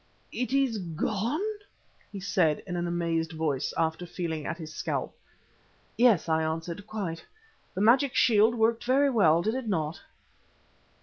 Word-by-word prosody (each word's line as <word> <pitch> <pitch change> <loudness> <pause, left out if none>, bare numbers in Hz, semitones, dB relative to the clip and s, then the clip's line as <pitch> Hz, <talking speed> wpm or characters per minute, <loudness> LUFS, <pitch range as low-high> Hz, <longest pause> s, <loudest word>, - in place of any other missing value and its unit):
"It 250 -1 -3
is 270 -5 +1
gone," 210 - -2 0.7
he 200 - -6
said 180 -5 +1
in 180 -2 -5
an 175 0 -1
amazed 165 -1 -1
voice 150 -4 -1
after 165 +2 -1
feeling 160 -4 -4
at - - -3
his 155 -2 -8
scalp. - - -3 0.8
"Yes," 230 -9 +4
I 160 0 +2
answered, 165 +5 -4
"quite. 185 -7 -4 0.5
The 190 - -2
magic 250 +5 +4
shield 225 0 +4
worked 225 0 +1
very 275 +3 +3
well, 170 -8 +4
did 220 - 0
it 260 -2 -4
not?" 160 -5 -2
180 Hz, 145 wpm, -28 LUFS, 160-225 Hz, 0.8 s, Yes